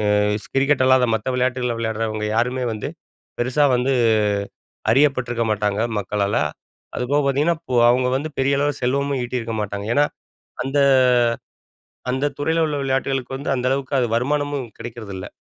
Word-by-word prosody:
அ - - +3 0.3
ஸ் - - -15
கிரிக்கெட் 135 0 +3
அல்லாத 130 -1 +5
மத்த 110 +3 -5
விளையாட்டுகள 125 -1 0
விளையாடுறவங்க 110 -1 -2
யாருமே 125 +2 0
வந்து, 105 - -5 0.5
பெருசா 130 +4 +2
வந்து 130 +2 +1 1.0
அறியப்பட்டிருக்க 125 -4 +2
மாட்டாங்க 105 0 -1 0.2
மக்களால. 100 +1 -1 0.6
அதுபோக 140 +4 +1
பாத்தீங்கன்னா, 150 +5 +2
இப்போ 125 -1 -2
அவுங்க 125 +1 +2
வந்து 155 +3 -4
பெரிய 140 +1 +2
அளவுல 145 0 0
செல்வமும் 140 +1 0
ஈட்டியிருக்க 120 -2 -3
மாட்டாங்க. 100 +1 -5
ஏன்னா, 145 0 +5 0.6
அந்த 135 +2 -1 1.3
அந்த 130 +3 0
துறையில 160 +3 +1
உள்ள 150 -1 -2
விளையாட்டுகளுக்கு 135 -1 -1
வந்து 140 - -4
அந்த 125 0 -1
அளவுக்கு 135 +1 -2
அது 125 - +2
வருமானமும் 145 +1 -1
கிடைக்கிறதில்ல. 110 -5 -7
130 Hz, 140 wpm, -21 LUFS, 115-140 Hz, 1.3 s, அல்லாத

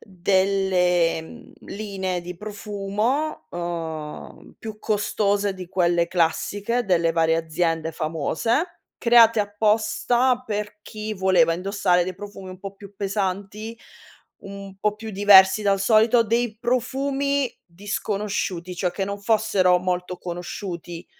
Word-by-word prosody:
delle, 185 -3 +1
mhmm, 240 +9 -13
linee 190 -3 -3
di 180 +1 -8
profumo, 210 - -3
ehm, 165 -3 -6
più 220 -2 -8
costose 205 -2 0
di 185 -2 -9
quelle 175 -2 +2
classiche 200 +7 0
delle 170 -3 +2
varie 160 0 +2
aziende 165 0 -1
famose, 165 - -1 0.2
create 230 -2 +6
apposta 225 +4 +1
per 210 0 -4
chi 215 0 -6
voleva 185 -4 +3
indossare 185 -1 +1
dei 185 - -5
profumi 195 0 -9
un 185 - -10
po' 195 +1 -8
più 200 0 -13
pesanti, 200 +2 -3 0.7
un 195 -1 -9
po' 210 +1 0
più 220 +1 -8
diversi 195 0 +6
dal 195 -1 +2
solito, 225 +3 +4
dei 230 0 -1
profumi 270 +3 0
disconosciuti, 195 -1 -3
cioè 180 0 -1
che 195 +2 -3
non 200 0 -5
fossero 200 -4 +3
molto 180 0 -3
conosciuti 175 -1 -6
195 Hz, 120 wpm, -23 LUFS, 180-215 Hz, 0.7 s, create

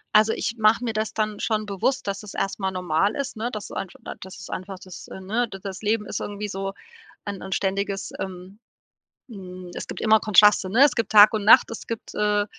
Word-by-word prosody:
Also, 215 +1 +5
ich 230 - -2
mach 215 0 +4
mir 235 -2 -2
das 215 0 -2
dann 215 -1 -2
schon 215 -1 -1
bewusst, 210 +5 -1
dass 200 0 -3
das 210 -2 -10
erst 195 - -2
mal 190 -1 -1
normal 185 +2 0
ist, 280 -4 -4
ne, 230 +3 -2
dass 210 -3 -7
einfach 190 - -6
da - - -7
das 190 0 -10
ist 185 - -10
einfach 190 +1 -6
das, 185 -1 -11
ne 215 +6 -2
d 195 -3 -9
das 195 -2 -7
Leben 215 0 0
ist - - -3
irgendwie 205 0 -5
so 195 0 -4 0.5
ein 200 -2 -5
'n 190 - -8
ständiges, 195 +1 -2
ähm 190 +2 -7 0.7
hm, 185 -4 -9
es - - -6
gibt - - -6
immer 220 0 +5
Kontraste, 210 -2 +5
ne? 235 +8 +5
Es 285 - +1
gibt 230 -3 -1
Tag 210 0 +8
und 215 -2 -1
Nacht, 215 - +7
es 230 - -7
gibt, 230 -1 -6
äh, 210 -1 +1
205 Hz, 225 wpm, -24 LUFS, 190-220 Hz, 0.7 s, Tag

